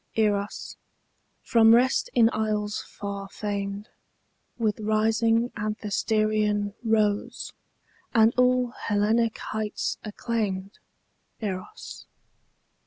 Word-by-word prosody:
EROS, 205 -2 -1 0.7
from 225 -2 +6
rest 250 +2 +2
in 235 -2 +6
isles 210 -1 -1
far 200 -1 -7
famed, 200 0 -4 0.7
With 220 -3 0
rising 225 +2 +2
Anthesterion 210 -1 0
rose, 215 -2 0 0.6
And 225 -1 +5
all 250 -1 +3 0.2
Hellenic 220 +2 +2
heights 215 -1 -3
acclaimed 210 -3 -3 0.6
Eros. 205 - -6
215 Hz, 80 wpm, -26 LUFS, 205-225 Hz, 0.7 s, from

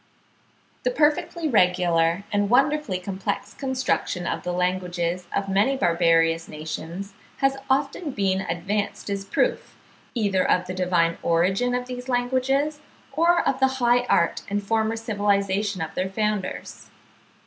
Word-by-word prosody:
The - - +1
perfectly 335 -3 +1
regular 180 - +2
and 205 0 +1
wonderfully 270 -4 +2
complex 195 +2 -4
construction 260 -9 -1
of - - -2
the 180 - -3
languages 180 -1 -1
of 200 0 -1
many 205 +8 +2
barbarous 165 -4 +2
nations 165 +5 -6 0.2
has 270 0 +2
often 280 +4 0
been 195 -6 0
advanced 200 +4 -3
as 200 -1 -2
a - - -20
proof, - - -1 0.4
either 200 -5 +1
of 180 - +2
the 185 - -5
divine 175 -2 +1
origin 190 +9 +1
of 250 0 -2
these 250 0 -7
languages, 260 +4 +1 0.3
or 340 +2 +3
of 265 - +1
the 265 - +5
high 245 0 +3
art 170 -8 +2
and 205 +1 -1
former 220 +2 0
civilisation 205 -3 0
of 160 - -6
their 185 +1 -2
founders. 210 -1 -3
200 Hz, 135 wpm, -24 LUFS, 180-250 Hz, 0.4 s, the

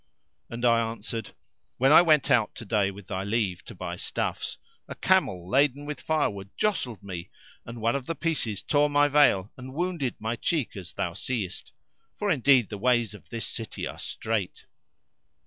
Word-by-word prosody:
And 120 +1 -3
I 115 -1 +5
answered, 115 0 -5 0.4
When 135 +3 +4
I 155 - +10
went 155 -5 +4
out 110 -4 +3
to 115 - -8
day 100 -1 +2
with 100 0 -10
thy 95 +1 -3
leave 100 -3 -1
to - - -9
buy - - -5
stuffs, - - -3 0.3
a - - -7
camel 90 -2 +2
laden 140 +4 +2
with 150 -2 -5
firewood 100 -11 -1
jostled 125 - -1
me 90 -3 -6 0.4
and 115 0 -7
one 115 +3 +2
of 135 -2 -3
the 165 - -2
pieces 135 - -1
tore 145 0 +3
my 145 0 +4
veil 130 -9 +4
and 130 +1 -9
wounded 170 -7 -1
my 110 +2 -2
cheek 150 -2 -1
as 95 -4 -8
thou - - -2
seest; 110 -8 -4 0.4
for 205 -1 0
indeed 130 - +4
the 105 - -6
ways 120 -2 +2
of 105 - -14
this 115 -1 -3
city 115 - -5
are - - -7
strait." 110 -4 -3
120 Hz, 180 wpm, -27 LUFS, 105-145 Hz, 0.4 s, I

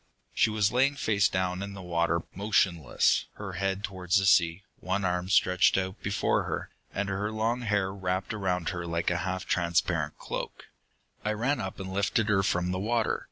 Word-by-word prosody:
"She - - +3
was 105 -1 +2
laying 135 +3 +3
face 105 -7 +2
down 95 0 -1
in 100 0 -5
the 100 - -8
water, 85 -1 +1
motionless, 95 - +2
her 100 -2 -7
head 95 +2 -1
towards 95 -1 0
the 95 - +2
sea, 85 -1 +4 0.2
one 95 +1 -1
arm 90 0 -1
stretched 90 -1 +4
out 95 +1 -3
before 100 0 0
her, - - -4 0.2
and 100 0 -2
her 100 +2 -2
long 115 +3 0
hair 100 -4 0
wrapped 95 +1 -2
around 90 -5 -1
her 90 -2 -4
like 85 +1 0
a 90 - +1
half 95 +1 -3
transparent 85 -3 0
cloak. - - -6 0.6
"I 105 - 0
ran 125 +7 0
up 95 +1 -5
and 95 -1 -5
lifted 100 +2 +1
her 95 -2 +4
from 90 -2 0
the 95 - -2
water. 115 +2 0
95 Hz, 185 wpm, -28 LUFS, 90-105 Hz, 0.6 s, sea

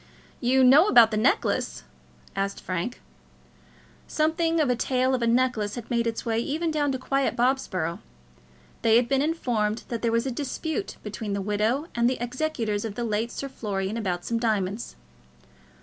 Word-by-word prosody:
"You 260 +2 +3
know 280 +9 +7
about 235 - +7
the - - -1
necklace?" 220 +5 +1 0.5
asked 195 0 -2
Frank. 185 +7 -4 1.1
Something 325 +1 +1
of 305 - +3
a - - +2
tale 255 +2 +1
of 255 - 0
a 235 - +1
necklace 235 -4 +1
had 240 -1 -8
made 235 -1 +1
its 230 0 -3
way 225 -1 0
even 315 +7 -1
down 295 -2 +1
to - - -1
quiet 275 +1 0
Bobsborough. 230 -10 0 0.8
They 225 -1 +4
had 240 +1 +4
been 270 +1 +2
informed 240 -9 -1
that 235 -2 -3
there 230 - +1
was 230 +2 +1
a 265 - -1
dispute 315 - -4
between 210 0 -4
the 200 - -1
widow 215 +8 0
and 235 0 +2
the 255 - -1
executors 240 -4 -2
of 220 -3 -5
the 240 - -3
late 225 +1 -1
Sir 275 - -5
Florian 205 -5 -3
about 185 -6 -2
some 230 -1 -1
diamonds. 215 -2 -1
235 Hz, 175 wpm, -26 LUFS, 215-265 Hz, 1.1 s, know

